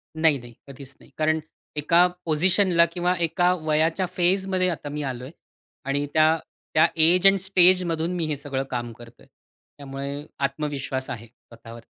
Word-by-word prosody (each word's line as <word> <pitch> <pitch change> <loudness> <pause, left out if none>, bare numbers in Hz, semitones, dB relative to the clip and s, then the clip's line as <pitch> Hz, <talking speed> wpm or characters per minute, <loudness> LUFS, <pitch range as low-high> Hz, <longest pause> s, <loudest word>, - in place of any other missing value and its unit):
नाही, 160 -3 +3
नाही, 120 -1 -13
कधीच 135 0 -12
नाही. - - -20
कारण 155 +1 +1 0.4
एका 170 +4 +4 0.2
पोझिशनला 170 +2 +3
किंवा 180 0 0
एका 175 +2 +2
वयाच्या 160 +4 +1
फेजमध्ये 185 +1 +1
आता 155 -3 -5
मी 150 +1 -4
आलोय. 130 +1 -6 0.5
आणि 140 +1 -1
त्या 155 +1 +4 0.4
त्या 155 - +5
एज 170 +4 +5
एंड 195 0 +5
स्टेजमधून 180 -3 +2
मी 170 -2 -1
हे 150 - -2
सगळं 135 -1 -4
काम 120 -1 -3
करतोय. 120 +1 -16 0.5
त्यामुळे 140 +1 -6 0.2
आत्मविश्वास 140 -2 -4
आहे 115 -1 -6
स्वतःवर. 115 0 -15
155 Hz, 145 wpm, -24 LUFS, 135-175 Hz, 0.5 s, त्या